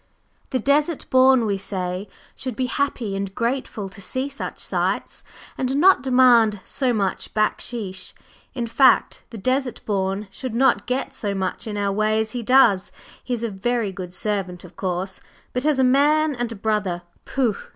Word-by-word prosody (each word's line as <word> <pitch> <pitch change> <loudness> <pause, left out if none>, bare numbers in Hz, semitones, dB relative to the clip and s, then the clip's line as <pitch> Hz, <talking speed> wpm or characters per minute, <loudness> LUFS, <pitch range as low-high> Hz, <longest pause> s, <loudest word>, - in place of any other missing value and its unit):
The 260 - 0
Desert 290 +4 +1
Born, 260 -2 +5
we 200 -2 -1
say, 185 0 -3 0.3
should 255 -3 -4
be 255 - -1
happy 250 -6 -1
and 195 -1 -4
grateful 235 -4 -2
to 200 +1 -12
see 260 +7 -3
such 280 - -6
sights, - - -2 0.4
and 260 +1 0
not 360 +1 +5
demand 250 -5 +5
so 260 -3 0
much 200 -5 -2
"backsheesh." 210 -3 -2 0.4
In 240 -3 -2
fact, 245 +2 +3
the 230 - -8
Desert 255 +4 -1
Born 195 0 -1
should 255 0 -6
not 265 +3 +3
get 255 +2 -2
so 200 -2 -2
much 190 +4 -3
in 210 -1 -4
our 200 -1 0
way 215 +2 +1
as 220 0 -1
he 245 - -3
does; 230 -6 +4 0.3
he 250 - -2
is 235 - -5
a 230 - 0
very 220 +2 -1
good 185 -2 -7
servant, 190 -2 -3
of 180 0 -14
course, 185 +1 -3 0.3
but 250 +4 0
as 300 -3 +3
a 265 - +3
man 295 +4 +4
and 240 -2 -3
a - - -5
brother 200 -4 -1 0.2
pooh! 245 -6 0
225 Hz, 175 wpm, -22 LUFS, 195-260 Hz, 0.4 s, Born